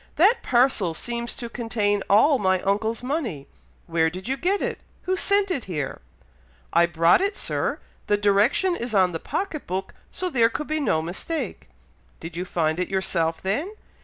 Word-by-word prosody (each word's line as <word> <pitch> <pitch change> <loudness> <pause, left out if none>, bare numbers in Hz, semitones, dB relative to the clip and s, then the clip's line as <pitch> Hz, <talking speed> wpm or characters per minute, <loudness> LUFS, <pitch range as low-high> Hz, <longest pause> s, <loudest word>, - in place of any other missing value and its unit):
That 440 +8 +4
parcel 240 -9 +2
seems 235 +4 -3
to 240 - -5
contain 220 -4 -1
all 255 +7 +5
my 185 -2 +2
uncle's 220 +4 0
money. 250 - -3 0.4
Where 165 -1 +2
did 185 +5 -8
you 265 - 0
get 370 +8 0
it? - - -3 0.2
Who 375 0 0
sent 400 0 +2
it 275 -10 -2
here?" 150 -7 -4 0.7
"I 170 0 +5
brought 170 - +4
it, 400 +1 -1
Sir! - - -1 0.3
The 205 - +3
direction 210 - +3
is 235 -7 -4
on 185 -2 +4
the 165 - -4
pocket 330 - -4
book, 190 +2 -3 0.2
so 370 - -3
there 235 -9 +3
could 300 +6 -4
be 310 +1 -1
no 180 - +1
mistake." 195 - -4 0.5
"Did 165 0 -8
you 180 +2 -3
find 160 -2 0
it 180 - 0
yourself 170 -4 0
then?" 285 - -1
215 Hz, 175 wpm, -24 LUFS, 180-295 Hz, 0.7 s, all